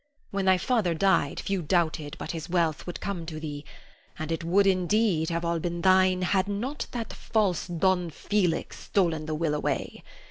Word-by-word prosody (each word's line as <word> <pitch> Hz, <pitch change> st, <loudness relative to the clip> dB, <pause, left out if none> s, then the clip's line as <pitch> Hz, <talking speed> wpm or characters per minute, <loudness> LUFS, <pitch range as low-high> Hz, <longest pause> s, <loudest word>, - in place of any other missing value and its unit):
When 195 Hz, -1 st, -1 dB
thy 190 Hz, -1 st, +5 dB
father 200 Hz, -5 st, +1 dB
died, 190 Hz, -5 st, +2 dB
few 195 Hz, -2 st, -1 dB
doubted 160 Hz, -3 st, 0 dB
but -, -, -5 dB
his 165 Hz, +1 st, -6 dB
wealth 170 Hz, -3 st, 0 dB
would 175 Hz, -, -5 dB
come 195 Hz, -4 st, -4 dB
to 155 Hz, -2 st, -5 dB
thee; 145 Hz, -2 st, -6 dB, 0.5 s
and 155 Hz, +1 st, -4 dB
it 165 Hz, 0 st, -2 dB
would, 190 Hz, +4 st, +3 dB
indeed, 185 Hz, -2 st, +2 dB
have 170 Hz, 0 st, -2 dB
all 170 Hz, 0 st, 0 dB
been 170 Hz, +1 st, -3 dB
thine 185 Hz, 0 st, +4 dB
had 190 Hz, +1 st, +2 dB
not 235 Hz, +9 st, -3 dB
that 235 Hz, -2 st, -5 dB
false 200 Hz, -7 st, 0 dB
Don 175 Hz, 0 st, +1 dB
Felix 180 Hz, +1 st, -1 dB
stolen 165 Hz, -5 st, 0 dB
the 155 Hz, -, -1 dB
will 155 Hz, -1 st, 0 dB
away. 150 Hz, -, -2 dB
175 Hz, 180 wpm, -27 LUFS, 160-195 Hz, 0.5 s, thy